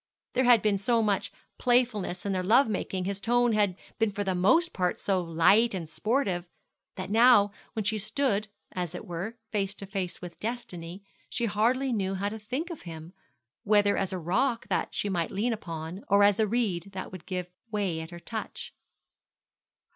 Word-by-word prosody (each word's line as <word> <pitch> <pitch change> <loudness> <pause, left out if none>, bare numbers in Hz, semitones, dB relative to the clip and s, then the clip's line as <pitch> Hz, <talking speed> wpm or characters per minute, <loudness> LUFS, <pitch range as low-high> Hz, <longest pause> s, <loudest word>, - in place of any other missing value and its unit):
There 260 +1 +2
had 240 -3 +6
been 205 -2 +2
so 230 +3 +2
much 205 -2 0 0.3
playfulness 240 -7 +1
in 200 - 0
their 185 - 0
love 230 +9 +5
making, 190 -3 -2
his 200 +1 -3
tone 240 0 +3
had 205 -4 +2 0.2
been 225 -1 +3
for 205 0 -2
the 190 -1 0
most 320 - +3
part 180 -1 0
so 190 -2 +1
light 185 +7 +4
and 170 -4 -4
sportive, 190 - -1 0.5
that 185 +1 -5
now, 225 -2 +6 0.2
when 220 - -2
she 215 +1 0
stood, 215 0 0 0.2
as 180 -2 -4
it - - -7
were, 180 +7 -5
face 200 -2 -1
to 200 - -8
face 190 -3 -4
with 175 -1 -9
destiny, 195 -6 -5 0.3
she 240 - -1
hardly 240 +5 +1
knew 195 -3 -1
how 200 +2 -1
to 220 +1 -7
think 260 - -4
of 330 - -7
him, 165 0 -9 0.5
whether 205 -1 +4
as 195 -1 -1
a 190 - -2
rock 215 +9 0
that - - -1
she - - -1
might 175 -5 -1
lean 230 +5 0
upon, 170 -2 -6
or 200 0 +5
as 205 0 +4
a 220 - +3
reed 200 -5 -1
that 190 - -6
would 185 -3 -10
give 180 -2 -4 0.2
way 195 -7 -1
at 160 - -8
her 175 0 -9
touch. 220 +5 -6
200 Hz, 190 wpm, -28 LUFS, 185-225 Hz, 0.5 s, had